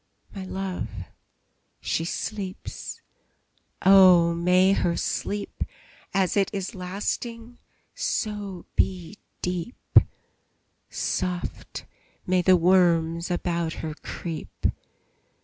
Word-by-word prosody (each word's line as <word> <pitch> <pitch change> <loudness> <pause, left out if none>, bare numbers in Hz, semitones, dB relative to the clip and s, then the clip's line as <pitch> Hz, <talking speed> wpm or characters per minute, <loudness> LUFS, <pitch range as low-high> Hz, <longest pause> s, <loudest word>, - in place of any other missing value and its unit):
My 195 -2 -6
love, 190 -1 -4 0.9
she 165 - -1
sleeps! 190 +1 -5 0.8
Oh, 185 -3 +7
may 180 +3 +4
her 170 -3 +1
sleep, 205 0 -2 0.5
As 190 -2 +1
it 200 -2 +3
is 195 +1 -4
lasting, 225 +5 -4 0.3
so 205 - -3
be 185 +1 0 0.2
deep; 180 +6 +2 0.9
Soft 180 -1 -3 0.4
may 185 0 +3
the 185 +1 +6
worms 170 -1 +3
about 170 -2 -1
her 155 - -3
creep! 165 +1 -7
185 Hz, 85 wpm, -26 LUFS, 170-195 Hz, 0.9 s, Oh